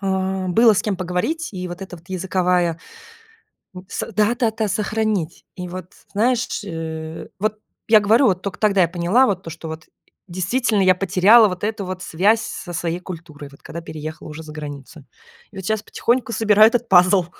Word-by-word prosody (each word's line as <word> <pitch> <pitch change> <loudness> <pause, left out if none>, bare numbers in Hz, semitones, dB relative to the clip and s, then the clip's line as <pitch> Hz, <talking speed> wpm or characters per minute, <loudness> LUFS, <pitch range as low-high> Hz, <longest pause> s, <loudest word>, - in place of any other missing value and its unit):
а, 190 -1 -1
было 225 +3 +5
с - - +1
кем 205 -3 -1
поговорить. 185 - -2
И 185 -2 -5
вот 175 +2 -7
это 185 -2 -8
вот 170 +2 -20
языковая 180 -2 0 1.0
у 180 - -9
с - - -4
да 215 +3 +2
да 235 -2 +1
да 220 -1 -2
сохранить. 210 -4 -2
И 180 -1 -6
вот 180 0 -8 0.2
знаешь 235 +4 +2
ш 205 - -4
э, 160 -1 -6
вот 215 +2 -1 0.3
я 215 -1 +7
говорю, 225 +6 +4
вот 185 -3 +1
только 200 - -5
тогда 200 -3 +3
я 170 - +4
поняла 180 +9 +3
вот 190 -3 -2
то, 165 - -7
что 165 0 -8
вот 160 +1 -8 0.4
действительно 200 +5 0
я 185 0 +6
потеряла 195 +5 +5
вот 180 +1 -7
эту 210 -1 -2
вот 185 0 -5
связь 200 +7 +2
со 180 -5 -7
своей 170 0 -2
культурой, 160 -5 -9
вот 140 - -18
когда 170 - -7
переехала 155 -1 -8
уже 155 +1 -8
за 155 - -10
границу. 145 -1 -9 0.5
И 200 - -18
вот 190 - -6
сейчас 220 0 -1
потихоньку 240 +2 -1
собираю 215 -1 +6
этот 240 0 -1
пазл. 185 0 +5
185 Hz, 195 wpm, -21 LUFS, 170-215 Hz, 1.0 s, я